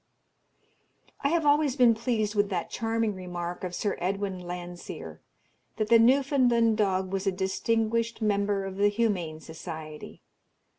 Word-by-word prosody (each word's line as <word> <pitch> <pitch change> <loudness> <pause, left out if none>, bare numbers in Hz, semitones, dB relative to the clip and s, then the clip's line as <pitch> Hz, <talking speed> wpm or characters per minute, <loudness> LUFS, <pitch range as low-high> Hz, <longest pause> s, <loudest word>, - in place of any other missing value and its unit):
I 280 - +3
have 330 0 +1
always 290 -2 +3
been 245 -4 +6
pleased 220 -2 -1
with 205 -1 +1
that 175 -4 -3
charming 225 -1 -1
remark 180 -1 -5
of 180 -1 -4
Sir 205 - -1
Edwin 190 +1 -2
Landseer, 175 0 -7 0.6
that 215 -1 -1
the 230 -1 +7
Newfoundland 245 -2 +4
dog 190 -2 0
was 195 +1 -2
a - - +4
"distinguished 225 +5 0
Member 200 -2 0
of 190 0 -6
the 205 +1 +4
Humane 200 -8 -1
Society." 160 -1 -9
205 Hz, 140 wpm, -28 LUFS, 185-230 Hz, 0.6 s, the